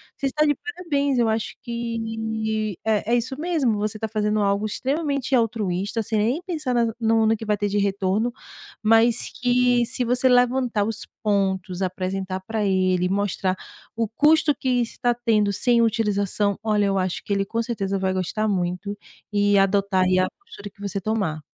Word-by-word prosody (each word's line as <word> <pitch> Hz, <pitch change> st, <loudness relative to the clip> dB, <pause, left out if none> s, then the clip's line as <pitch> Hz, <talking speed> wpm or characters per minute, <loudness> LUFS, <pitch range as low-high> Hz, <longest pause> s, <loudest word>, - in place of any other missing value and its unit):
você 275 Hz, -, -2 dB
está 300 Hz, +3 st, +1 dB
de 290 Hz, -1 st, +2 dB
parabéns. 290 Hz, -6 st, -2 dB
Eu 235 Hz, -, +3 dB
acho 220 Hz, 0 st, -1 dB
que 220 Hz, -3 st, -3 dB
é 220 Hz, +1 st, +1 dB
é -, -, +6 dB
isso 255 Hz, +3 st, -3 dB
mesmo. 310 Hz, -8 st, +1 dB
Você 215 Hz, +1 st, -2 dB
está 220 Hz, 0 st, -3 dB
fazendo 215 Hz, 0 st, 0 dB
algo 200 Hz, +1 st, +1 dB
extremamente 275 Hz, +3 st, -1 dB
altruísta, 210 Hz, -2 st, 0 dB
sem 215 Hz, 0 st, -2 dB
nem 240 Hz, +11 st, +1 dB
pensar 305 Hz, -8 st, -2 dB
na 230 Hz, -2 st, +1 dB
no 225 Hz, -1 st, +2 dB
no 220 Hz, +1 st, +3 dB
que 220 Hz, -, -7 dB
vai 210 Hz, -1 st, +1 dB
ter 205 Hz, 0 st, -1 dB
de 205 Hz, -, -1 dB
retorno, 200 Hz, +3 st, 0 dB, 0.5 s
mas 225 Hz, +2 st, +3 dB
que 245 Hz, -1 st, +3 dB
se 245 Hz, +2 st, -2 dB
você 250 Hz, +2 st, +2 dB
levantar 245 Hz, -3 st, +2 dB
os 220 Hz, -1 st, -4 dB, 0.2 s
pontos, 190 Hz, -3 st, 0 dB
apresentar 185 Hz, 0 st, -2 dB
para 220 Hz, -2 st, -1 dB
ele, 185 Hz, -2 st, +2 dB
mostrar 195 Hz, -1 st, 0 dB, 0.4 s
o 225 Hz, -2 st, +1 dB
custo 300 Hz, +5 st, +3 dB
que 250 Hz, -2 st, 0 dB
está 245 Hz, +1 st, -2 dB, 0.2 s
tendo 210 Hz, -3 st, +3 dB
sem 235 Hz, +4 st, +2 dB
utilização. 205 Hz, -2 st, +1 dB
Olha, 210 Hz, -2 st, +2 dB
eu 195 Hz, 0 st, +1 dB
acho 185 Hz, -1 st, -2 dB
que 200 Hz, -, -1 dB
ele 195 Hz, 0 st, +1 dB
com 230 Hz, +3 st, -2 dB
certeza 200 Hz, -4 st, -2 dB
vai 190 Hz, 0 st, 0 dB
gostar 190 Hz, +4 st, -1 dB
muito 190 Hz, +1 st, -2 dB, 0.4 s
e 205 Hz, 0 st, +3 dB
adotar 195 Hz, -1 st, +2 dB
e 185 Hz, 0 st, +3 dB
a 185 Hz, -, +2 dB
postura 370 Hz, -, -11 dB
que 200 Hz, -, -33 dB
você 200 Hz, -1 st, -3 dB
tomar. 190 Hz, -7 st, -1 dB
215 Hz, 180 wpm, -23 LUFS, 200-240 Hz, 0.5 s, é